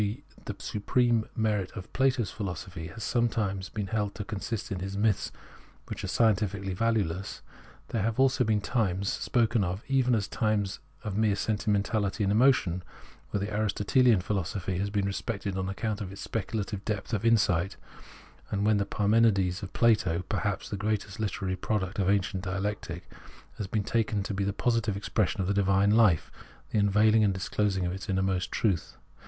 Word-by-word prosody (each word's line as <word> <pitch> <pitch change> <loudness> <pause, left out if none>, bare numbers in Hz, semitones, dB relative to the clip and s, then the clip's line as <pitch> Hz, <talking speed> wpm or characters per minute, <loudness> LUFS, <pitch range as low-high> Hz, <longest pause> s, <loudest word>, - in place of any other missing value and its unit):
g. 105 +7 -2 0.2
the - - -4
supreme 115 +2 +1
merit 105 -5 0
of 95 - -9
Plato's 130 -4 +2
philosophy 90 -4 -5
has 115 - -8
sometimes 105 -5 0
been 105 -2 -3
held 105 0 -2
to 105 - -4
consist 105 +1 -4
in 95 - -2
his 95 +1 -4
myths 105 -1 +1 0.6
which - - -5
are - - -2
scientifically 100 -3 +1
valueless, 100 -4 -1 0.5
there 115 - -1
have 110 +4 -1
also 130 -1 +4
been 110 -2 +1
times, 100 -5 0
spoken 115 -3 +1
of 95 +3 -3
even 130 -3 +3
as 100 -2 0
times 105 -4 0 0.2
of 105 -4 -3
mere 105 -1 +3
sentimentahty 105 -1 0
and 100 - +2
emotion, 110 -6 +3 0.5
when 100 -1 -1
the 105 - -6
AristoteHan 105 +1 +3
philosophy 95 -1 -2
has 100 +1 -1
been 100 -1 0
respected 100 0 -3
on 95 0 -2
account 105 +2 -2
of 95 -2 -5
its 100 - -7
specu 110 0 -3
lative 100 0 -4
depth 105 +2 -3
of 110 - 0
insight, 100 -5 +2 0.7
and 100 0 0
when 110 -1 +4
the 100 - 0
Parmenides 100 -4 +2
of 100 - -6
Plato 100 -7 +3
— - - -31
perhaps 100 -2 -1
the 100 - -4
greatest 105 0 -2
hterary 95 -3 -2
product 100 -2 -1
of 95 -1 +2
ancient 95 -2 +1
dialectic 95 -2 -3 0.3
— - - -23
has 105 - -2
been 105 +1 -1
taken 105 -2 0
to 105 - -4
be 100 +1 -1
the 100 - 0
positive 115 -1 0
expression 100 -2 0
of 90 - -1
the 100 - +2
divine 100 0 +3
life, 105 -7 +4 0.4
the 110 - +2
unveiling 105 +2 +4
and 100 -2 +2
disclosing 95 0 0
of 90 - -1
its 95 +2 -7
inmost 95 -1 0
truth. 95 -7 0
100 Hz, 180 wpm, -29 LUFS, 95-110 Hz, 0.7 s, also